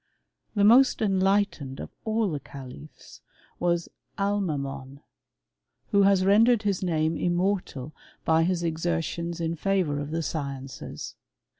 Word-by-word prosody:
The 205 - +3
most 245 +6 +6
enlightened 195 -9 +1
of - - -7
all 220 -3 +1
the 150 - -2
califs 135 +2 -12 0.4
was 170 -1 +1 0.3
Alma 200 -6 0
men, 135 0 -6 0.9
who 200 - +5
has 195 -1 +4
rendered 220 +3 +5
his 200 -3 0
name 160 -3 0
immortal 175 -6 -1 0.3
by 160 0 +4
his 175 0 0
exertions 170 +1 -2
in 165 0 -1
favour 170 -4 0
of 145 0 -4
the 165 +1 -2
sciences. 140 -4 -5
170 Hz, 125 wpm, -26 LUFS, 150-195 Hz, 0.9 s, most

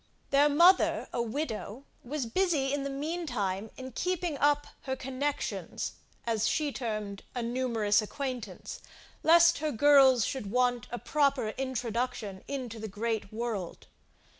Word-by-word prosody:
Their 285 +1 +5
mother, 345 +6 +5
a 235 - 0
widow, 235 -1 -4 0.2
was 275 +1 -3
busy 285 0 +1
in 285 - 0
the 275 - -2
mean 315 +5 -3
time 205 -4 -2
in 260 0 -7
keeping 355 +2 -1
up 290 0 +3 0.2
her 265 -1 -1
connexions, 265 +2 -3 0.3
as 225 -2 +1
she 300 -2 0
termed 215 -6 -4
a 245 - -2
numerous 230 -4 +1
acquaintance 255 +2 -5 0.4
lest 335 0 +6
her 305 0 -1
girls 265 -2 +6
should 255 -7 -4
want 245 0 +1
a 240 - -3
proper 280 -5 +1
introduction 240 -5 -3
into 250 -5 -5
the 220 - -5
great 215 0 -3
world. 215 -5 -4
255 Hz, 140 wpm, -30 LUFS, 225-285 Hz, 0.4 s, lest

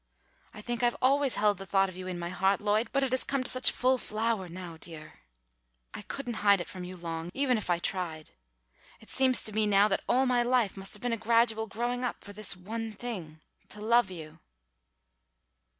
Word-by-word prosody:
I 210 - -10
think 240 +1 -3
I've 240 -1 +2
always 275 0 +3
held 205 -2 +2
the 195 - -7
thought 195 +1 +3
of 185 - -9
you 185 0 -7
in 180 -1 -4
my 170 0 -4
heart, 190 +2 +1
Lloyd, 215 +3 +1
but 275 0 +1
it 265 - -1
has 260 - +2
come 275 -2 -1
to - - +2
such 255 0 +5
full 255 +1 +2
flower 215 -3 -1
now, 175 -1 -8
dear, 160 -2 -10 0.7
I - - -6
couldn't 245 -5 -5
hide 200 -1 +5
it 175 - -5
from 185 - -7
you 180 +1 -8
long, 165 -1 -5
even 270 -2 +2
if 215 -4 -4
I 175 - +3
tried. 170 -3 -4 0.7
It 220 - -15
seems 260 -1 +3
to 215 - 0
me 215 0 +2
now 200 0 +5
that 195 - +1
all 255 +2 +4
of - - +1
my 250 -1 +3
life 240 -4 +1
must 195 0 -4
have 210 - -4
been 245 -1 0
a - - 0
gradual 225 0 +2
growing 240 +4 -2
up 250 - -3
for 205 - -10
this 210 -1 +1
one 220 +5 -5
thing 185 -9 -6 0.3
to 210 - -5
love 230 0 +3
you!" 160 -3 -9
215 Hz, 220 wpm, -29 LUFS, 185-240 Hz, 0.7 s, such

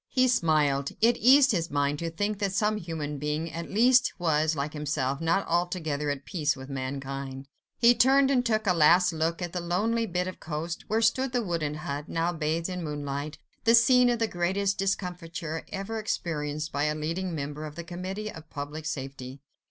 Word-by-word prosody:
He 255 -1 +3
smiled. 150 - +2
It 235 +2 +4
eased 270 +2 +6
his 170 -5 -1
mind 145 0 0
to 170 - -2
think 205 +5 -2
that 200 -2 -1
some 210 +2 +1
human 155 -5 -5
being 150 +3 -2
at 170 0 -5
least 250 +4 +4
was, 160 -3 +1
like 145 +1 -3
himself, 145 -2 -2
not 170 +4 +1
altogether 165 -4 -1
at 145 -1 -3
peace 155 -6 0
with 130 +1 -10
mankind. 135 0 -5 0.3
He 235 +1 +6
turned 270 +2 +4
and 250 -2 +3
took 220 -2 0
a 185 - +3
last 175 +2 +5
look 165 +2 -1
at 175 - -5
the 180 - -1
lonely 220 +7 0
bit 180 -1 -1
of 185 - -7
coast, 160 +2 -5
where 225 +1 +1
stood 260 +3 +2
the 245 -2 +1
wooden 165 -6 -2
hut, 145 0 -5
now 165 +1 0
bathed 160 +1 -1
in 180 -2 -4
moonlight, 145 0 -4 0.3
the 230 +1 +6
scene 245 +1 +6
of 240 - +1
the 225 - +1
greatest 190 +2 -1
discomfiture 170 -4 -3
ever 205 +3 -4
experienced 155 -7 -3
by 145 +1 0
a 150 0 0
leading 165 +3 -3
member 145 +1 -5
of 150 -1 -8
the 170 - -6
Committee 185 +5 -5
of 160 0 -12
Public 150 +1 -6
Safety. 135 -2 -6
165 Hz, 190 wpm, -27 LUFS, 150-200 Hz, 0.3 s, eased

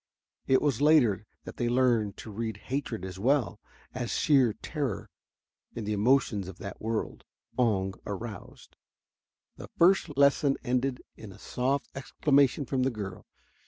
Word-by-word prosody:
It 130 - +3
was 140 -4 +1
later 120 -10 +4 0.2
that - - -10
they 120 -1 0
learned 120 -5 +2
to 110 - -9
read 110 0 -4
hatred 120 -5 -4
as 95 0 -7
well 125 -2 +1 0.3
as 120 -2 -3
sheer 130 -7 +3
terror 140 - -4 0.6
in 115 - -4
the 105 +1 -2
emotions 105 -3 +2
that 95 -2 -9
the 100 - -6
word 110 0 -3 0.4
Oong 95 -6 +1
aroused. 105 +1 -8 0.8
The - - -10
first 170 -5 +3
lesson 140 0 +4
ended 125 0 -1
in 110 -3 -10
a - - -13
soft 135 +3 -1
exclamation 140 0 +2
from 130 0 -1
the 130 - +2
girl. 100 -6 -7
120 Hz, 145 wpm, -28 LUFS, 105-135 Hz, 0.8 s, later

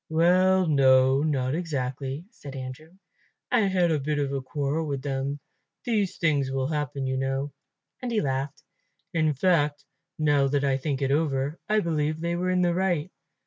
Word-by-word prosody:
"Well, 185 +3 +4
no, 135 -3 +4
not 135 -4 0
exactly," 140 -2 -3
said 140 -1 -10
Andrew. 130 +5 -8 0.6
"I 245 - +4
had 180 -3 +2
a 155 - +1
bit 150 +2 -1
of 140 -1 -1
a 135 - -1
quarrel 145 +4 -2
with 140 -2 -3
them. 140 +1 -2 0.4
These 210 -6 0
things 145 -6 +1
will 135 0 -1
happen, 145 -3 -2
you 130 0 -1
know"; 135 +2 -2 0.5
and 250 -1 -3
he 225 - +2
laughed. 135 -1 -2 0.5
"In 155 -2 +2
fact, 150 -2 +1 0.3
now 145 -3 +3
that 140 +1 0
I 135 -1 +2
think 140 0 -2
over 135 -1 +1
it, 155 - -13
I 215 0 +3
believe 155 -2 -1
they 170 +1 -1
were 180 +1 -1
in 180 0 +2
the 175 -1 +2
right. 180 -2 0
145 Hz, 175 wpm, -26 LUFS, 135-170 Hz, 0.6 s, Well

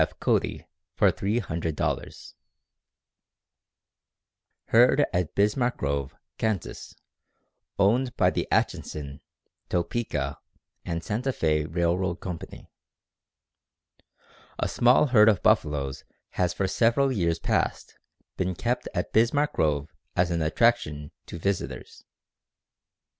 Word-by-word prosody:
F. - - -1
Cody - - 0 0.3
for - - +4
$300. 85 -7 -3 2.4
Herd 125 +5 +5
at 90 -3 -1
Bismarck 120 +5 +1
Grove, 70 -2 -2 0.2
Kansas, 110 -6 -3 0.8
owned 120 +6 +2
by - - +4
the - - -2
Atchison, 70 -2 -2 0.5
Topeka 85 - -2 0.4
and 85 -2 -4
Santa 115 +8 -2
Fé 75 - 0
Railroad 85 +2 0
Company. 90 -3 -8 1.9
A - - 0
small 125 +4 +4
herd 110 -5 +6
of 100 -4 +1
buffaloes 70 -3 +1 0.3
has 90 -1 0
for 95 - -1
several 120 +7 +2
years 85 -8 0
past - - -1 0.4
been 95 -1 -1
kept 120 +6 -2
at - - -2
Bismarck 140 +7 +2
Grove 75 -1 0 0.2
as 90 0 +2
an 85 -1 0
attraction 75 -4 +1 0.2
to - - -7
visitors. 100 +3 -4
90 Hz, 100 wpm, -26 LUFS, 80-115 Hz, 2.4 s, herd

